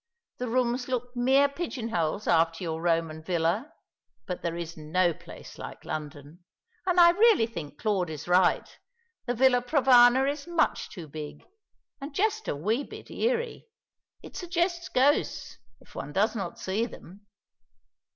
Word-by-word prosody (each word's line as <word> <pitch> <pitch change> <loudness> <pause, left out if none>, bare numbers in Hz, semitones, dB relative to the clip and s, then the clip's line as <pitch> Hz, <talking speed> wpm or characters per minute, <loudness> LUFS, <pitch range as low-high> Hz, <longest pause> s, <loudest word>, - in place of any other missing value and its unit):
The 250 - -2
rooms 245 +1 0
look 250 -1 -3
mere 265 +3 +4
pigeon 280 -6 -5
holes 170 +1 -1
after 165 0 +2
your 160 -1 -3
Roman 165 -2 0
villa; 165 0 -1 0.5
but 180 - -5
there's 170 -1 -4
no 165 +3 +1
place - - -13
like - - -9
London. 150 +2 -7 0.4
And 360 -1 +3
I 345 0 +9
really 420 - +5
think 160 -10 -8
Claude 195 -6 0
is 155 0 -7
right. 180 0 +3 0.6
The 245 - 0
Villa 250 0 +4
Provana 255 -1 +5
is 285 +2 -3
much 340 -2 0
too 170 -5 -9
big, 150 0 -8 0.6
and 280 +1 -7
just 435 +3 0
a - - -1
wee 215 - -1
bit - - -11
eerie. 475 -1 -2 0.6
It - - -12
suggests 345 0 -1
ghosts, 275 +3 +1 0.2
if - - -20
one 145 - -6
does 210 +5 +2
not 195 -5 -4
see 210 +5 -1
them. 200 -1 -14
225 Hz, 150 wpm, -27 LUFS, 170-275 Hz, 0.6 s, I